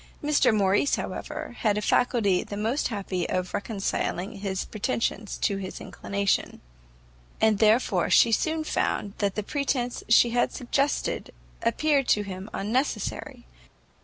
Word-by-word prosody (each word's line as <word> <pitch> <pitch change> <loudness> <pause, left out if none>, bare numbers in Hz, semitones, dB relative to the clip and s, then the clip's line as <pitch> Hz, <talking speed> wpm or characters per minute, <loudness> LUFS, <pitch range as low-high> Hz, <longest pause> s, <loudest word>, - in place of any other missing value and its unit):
Mr 295 -4 +4
Morrice, 205 +5 +3
however, - - -5
had 210 -2 +2
a - - 0
faculty 220 -7 +2
the 205 - -7
most 225 +7 0
happy 195 -5 -3
of 185 0 -2
reconciling 200 -1 -2
his 190 -1 -2
pretensions 215 -1 -2
to 200 - 0
his 190 -1 -6
inclination; 200 0 -2 0.8
and 220 -2 +3
therefore 215 -5 +3
she 230 - +6
soon 315 +8 +1
found 205 -8 -1
that 200 -2 0
the 210 - -2
pretence 255 -1 -1
she 235 +1 +6
had 240 +1 +2
suggested 275 +3 -1 0.3
appeared 275 +3 +2
to 210 - +3
him 190 +1 -7
unnecessary. 220 - -2
215 Hz, 135 wpm, -26 LUFS, 200-245 Hz, 0.8 s, she